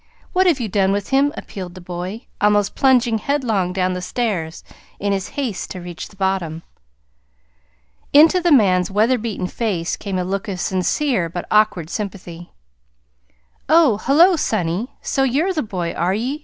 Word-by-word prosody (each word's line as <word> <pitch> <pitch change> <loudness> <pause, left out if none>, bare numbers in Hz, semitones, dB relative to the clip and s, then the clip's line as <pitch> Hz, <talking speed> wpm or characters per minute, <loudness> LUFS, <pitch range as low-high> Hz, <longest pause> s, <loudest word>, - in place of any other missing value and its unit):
What 375 0 +3
have 325 -6 +3
you 235 - -2
done 195 -1 +1
with 200 0 -2
him?" 275 +2 +3
appealed 185 -4 -8
the - - -9
boy, 180 +6 -6 0.2
almost 205 -1 +2
plunging 245 -4 +3
headlong 225 -10 0
down 185 0 0
the 180 - -4
stairs 180 -6 -3 0.4
in 200 0 0
his 195 -1 -2
haste 250 -9 -3
to 185 - -6
reach 175 -1 -7
the - - -19
bottom. 190 -4 -2 1.5
Into 320 +5 +6
the 345 -1 +2
man's 185 -9 +4
weather 220 +5 +2
beaten 215 -4 -3
face 180 -4 -2
came 195 -2 -4
a 180 - 0
look 195 +3 -3
of 190 -3 -4
sincere 190 - 0
but 175 +1 -5
awkward 210 -6 +2
sympathy. 180 -5 -6 1.2
"Oh, 305 -10 +5
hullo, 335 +7 +5
sonny! 195 - -1 0.2
So 270 - -1
you're 285 +9 +1
the 310 - -1
boy, 180 - -4
are 180 +3 0
ye?" 255 +7 -2
205 Hz, 165 wpm, -20 LUFS, 180-255 Hz, 1.5 s, Into